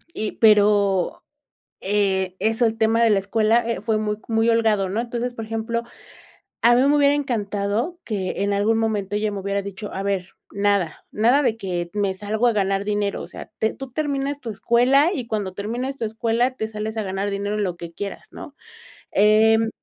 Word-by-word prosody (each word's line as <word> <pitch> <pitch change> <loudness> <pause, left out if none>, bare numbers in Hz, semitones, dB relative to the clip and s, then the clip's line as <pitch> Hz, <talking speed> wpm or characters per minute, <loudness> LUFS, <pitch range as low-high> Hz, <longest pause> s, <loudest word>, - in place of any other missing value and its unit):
Y 215 0 -3
pero, 205 -4 +3 0.6
eh, 190 -2 0
eso, 225 +3 +2
el 225 0 -1
tema 225 +1 +3
de 230 - +4
la 205 - +4
escuela, 220 +4 +2
eh, 230 - -2
fue 215 0 0
muy 210 -1 -1
c 215 - -25
muy 225 0 +2
holgado, 220 -4 +2
¿no? 210 +4 -1
Entonces, 240 +1 -3
por 225 - -6
ejemplo, 225 +1 -2 0.8
a 240 +1 +6
mí 250 - +4
me 285 +2 +4
hubiera 285 -1 +4
encantado 225 - -2
que 195 -3 -3
en 200 - 0
algún 215 +3 +2
momento 205 -3 -1
ella 210 0 -1
me 200 - -4
hubiera 200 +1 -2
dicho: 200 +1 -7
"a 195 - -3
ver, 195 -2 -1 0.2
nada, 200 -5 0
nada 240 +7 +3
de 225 -5 +1
que 175 -5 -4
me 200 -2 0
salgo 210 +4 -1
a - - +2
ganar 195 -1 0
dinero, 205 -1 -1
o - - -8
sea, - - -10
te 220 - +1
tú 270 -1 -8
terminas 285 -1 -2
tu 235 - -6
escuela 250 - +3
y 255 -8 -4
cuando 205 -4 -3
termines 240 +7 -4
tu 235 - -3
escuela 230 +3 0
te 220 - -2
sales 220 0 -5
a 220 - -1
ganar 195 +1 -2
dinero 200 +1 -2
en 210 - -1
lo 180 -3 -3
que 170 -1 -8
quieras", 200 +3 -7
¿no? 285 - -10 0.6
Em, 220 +2 +4
215 Hz, 200 wpm, -22 LUFS, 200-230 Hz, 0.8 s, a